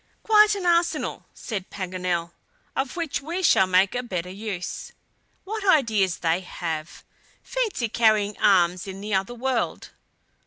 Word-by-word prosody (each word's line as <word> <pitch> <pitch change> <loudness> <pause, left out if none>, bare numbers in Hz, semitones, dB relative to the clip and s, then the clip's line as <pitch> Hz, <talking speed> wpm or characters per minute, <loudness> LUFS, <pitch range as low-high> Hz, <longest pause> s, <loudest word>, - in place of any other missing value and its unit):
"Quite 425 -1 +5
an 390 -3 -4
arsenal!" 340 -2 +1
said 195 -5 -6
Paganel, 180 -3 -3 0.4
"of 270 -1 -2
which 330 -5 -2
we 340 +6 -4
shall 190 - +5
make 185 +1 +3
a 245 - -1
better 180 -7 -4
use. 195 -2 -5 0.5
What 430 +2 -5
ideas 220 - +3
they 165 +1 +1
have! 165 -3 -6 0.4
Fancy 440 - -1
carrying 215 -2 +2
arms 180 -1 +3
in 190 0 -7
the 205 +1 -4
other 195 +5 0
world!" 255 0 -2
210 Hz, 140 wpm, -24 LUFS, 185-310 Hz, 0.5 s, Quite